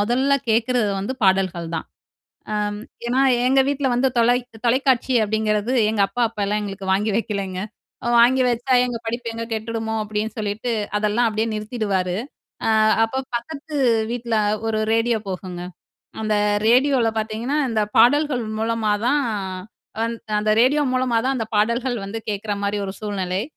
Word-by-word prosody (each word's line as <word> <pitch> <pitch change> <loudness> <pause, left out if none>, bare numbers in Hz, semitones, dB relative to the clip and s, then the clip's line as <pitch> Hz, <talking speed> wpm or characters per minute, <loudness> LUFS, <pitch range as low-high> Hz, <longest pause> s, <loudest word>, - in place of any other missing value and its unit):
மொதல்ல 260 +6 +2
கேட்கறது 230 -1 +2
வந்து 230 +7 -3
பாடல்கள் 190 -3 +1
தான். 160 - -5 0.7
அம் 210 0 -1 0.3
ஏன்னா, 255 +3 +1 0.3
எங்க 270 +1 +4
வீட்ல 280 -1 0
வந்து 260 +2 +2
தொலை 240 +1 +4 0.3
தொலைக்காட்சி 260 +1 +2
அப்படிங்கிறது 215 +2 0 0.2
எங்க 220 - -1
அப்பா 240 +5 -2
அப்பலாம் 210 -1 -1
எங்களுக்கு 195 -1 -6
வாங்கி 210 +3 +1
வைக்கலங்க. 200 -4 -2 0.6
வாங்கி 255 +2 +5
வச்சா 245 +2 -1
எங்க 245 -2 -3
படிப்பு 235 +1 -3
எங்க 230 0 -4
கெட்டுடுமோ 225 0 -3
அப்டின்னு 215 +2 -3
சொல்லிட்டு 215 +3 -2 0.3
அதெல்லாம் 215 +3 +2
அப்டியே 220 +1 -1
நிறுத்திடுவாரு. 210 -4 -2 0.5
ஆ - - +2 0.4
அப்ப 265 +4 -2
பக்கத்து 295 +5 -6 0.3
வீட்ல 235 -1 -2 0.3
ஒரு 220 -1 0
ரேடியோ 230 0 +2
போகுங்க. 180 -1 -5 0.6
அந்த 215 -1 0 0.3
ரேடியோல 255 0 +4
பாத்தீங்கன்னா, 220 +6 -2
இந்த 220 -1 +1 0.2
பாடல்கள் 255 +1 +4 0.2
மூலமா 225 -1 0
தான் 290 +3 +3 0.8
வந் 230 +1 -1 0.2
அந்த 215 +1 0
ரேடியோ 280 +5 +4
மூலமா 255 -2 +1
தான் 265 +1 +1
அந்த 230 - -1
பாடல்கள் 235 +4 +1
வந்து 200 +3 -5
கேட்கற 205 0 -3
மாரி 200 +1 -1
ஒரு 190 - -4
சூழ்நிலை. 195 -2 -2
225 Hz, 145 wpm, -22 LUFS, 210-245 Hz, 0.8 s, வாங்கி